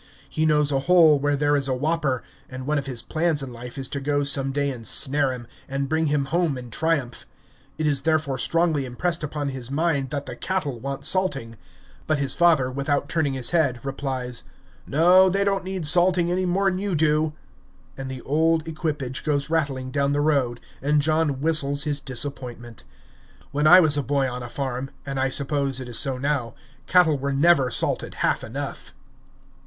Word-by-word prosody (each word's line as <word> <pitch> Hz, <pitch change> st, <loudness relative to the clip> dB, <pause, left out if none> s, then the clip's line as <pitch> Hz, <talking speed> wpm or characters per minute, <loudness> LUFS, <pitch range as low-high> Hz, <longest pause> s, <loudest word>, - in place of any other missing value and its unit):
He 155 Hz, 0 st, -1 dB
knows 150 Hz, -1 st, +2 dB
a 135 Hz, -, +1 dB
hole 160 Hz, -1 st, +5 dB
where 145 Hz, +1 st, +1 dB
there 145 Hz, +1 st, +1 dB
is 140 Hz, -1 st, 0 dB
a 130 Hz, -, 0 dB
whopper; 145 Hz, -2 st, -1 dB, 0.3 s
and 130 Hz, 0 st, -7 dB
one 150 Hz, +1 st, 0 dB
of 135 Hz, -, -7 dB
his 125 Hz, -3 st, -3 dB
plans 160 Hz, -3 st, 0 dB
in 130 Hz, -2 st, -7 dB
life 120 Hz, +3 st, -9 dB
is 135 Hz, -1 st, -1 dB
to 140 Hz, -, -3 dB
go 145 Hz, +1 st, 0 dB
some 140 Hz, -1 st, +2 dB
day 140 Hz, 0 st, -1 dB
and 115 Hz, -4 st, -6 dB
snare 140 Hz, 0 st, +5 dB
him, 125 Hz, -2 st, -7 dB, 0.2 s
and 135 Hz, 0 st, -2 dB
bring 160 Hz, +2 st, 0 dB
him 145 Hz, -1 st, 0 dB
home 165 Hz, -1 st, 0 dB
in 125 Hz, -2 st, -9 dB
triumph. 140 Hz, -4 st, -1 dB, 0.5 s
It 155 Hz, -, -2 dB
is 145 Hz, -3 st, +2 dB
therefore 155 Hz, -5 st, 0 dB
strongly 165 Hz, -4 st, +1 dB
impressed 165 Hz, +7 st, -2 dB
upon 145 Hz, -1 st, -3 dB
his 130 Hz, -3 st, -6 dB
mind 140 Hz, -2 st, 0 dB
that 145 Hz, 0 st, -4 dB
the -, -, -7 dB
cattle 155 Hz, -10 st, -3 dB
want 140 Hz, +2 st, -5 dB
salting. 140 Hz, -12 st, 0 dB, 0.5 s
But 155 Hz, -, +1 dB
his 140 Hz, -1 st, -2 dB
father, 160 Hz, -7 st, +3 dB
without 140 Hz, +2 st, -1 dB
turning 155 Hz, -5 st, 0 dB
his 130 Hz, -2 st, 0 dB
head, 140 Hz, -8 st, 0 dB
replies, 130 Hz, -3 st, -4 dB, 0.5 s
"No, 180 Hz, +5 st, +5 dB
they 195 Hz, +2 st, +1 dB
don't 195 Hz, -1 st, 0 dB
need 185 Hz, -3 st, -4 dB
salting 175 Hz, +2 st, +4 dB
any 185 Hz, +1 st, 0 dB
more 195 Hz, +3 st, +1 dB
'n 185 Hz, -1 st, 0 dB
you 200 Hz, -2 st, -2 dB
do!" 155 Hz, 0 st, +1 dB, 0.6 s
And 135 Hz, 0 st, -6 dB
the 130 Hz, -1 st, -7 dB
old 160 Hz, +2 st, +1 dB
equipage 150 Hz, -5 st, -4 dB
goes 145 Hz, -1 st, -1 dB
rattling 135 Hz, -5 st, -1 dB
down 140 Hz, 0 st, 0 dB
the 145 Hz, -, 0 dB
road, 135 Hz, -6 st, +1 dB, 0.2 s
and 145 Hz, +2 st, +2 dB
John 155 Hz, -2 st, 0 dB
whistles 145 Hz, -2 st, +2 dB
his 150 Hz, -2 st, -2 dB
disappointment. 125 Hz, -3 st, -6 dB, 0.7 s
When 150 Hz, +2 st, +1 dB
I 180 Hz, +3 st, +9 dB
was 155 Hz, -4 st, +4 dB
a -, -, +1 dB
boy 140 Hz, 0 st, 0 dB
on 125 Hz, 0 st, -5 dB
a 120 Hz, -, -7 dB
farm, 135 Hz, 0 st, -4 dB, 0.2 s
and 135 Hz, -1 st, -4 dB
I 135 Hz, 0 st, +1 dB
suppose 140 Hz, -1 st, -1 dB
it 130 Hz, -, -7 dB
is 120 Hz, -2 st, -3 dB
so 135 Hz, -3 st, 0 dB
now, 135 Hz, -3 st, -2 dB, 0.3 s
cattle 160 Hz, -6 st, +4 dB
were 140 Hz, +1 st, -2 dB
never 140 Hz, -2 st, +3 dB
salted -, -, -1 dB
half -, -, 0 dB
enough! -, -, -7 dB
145 Hz, 195 wpm, -23 LUFS, 135-160 Hz, 0.7 s, I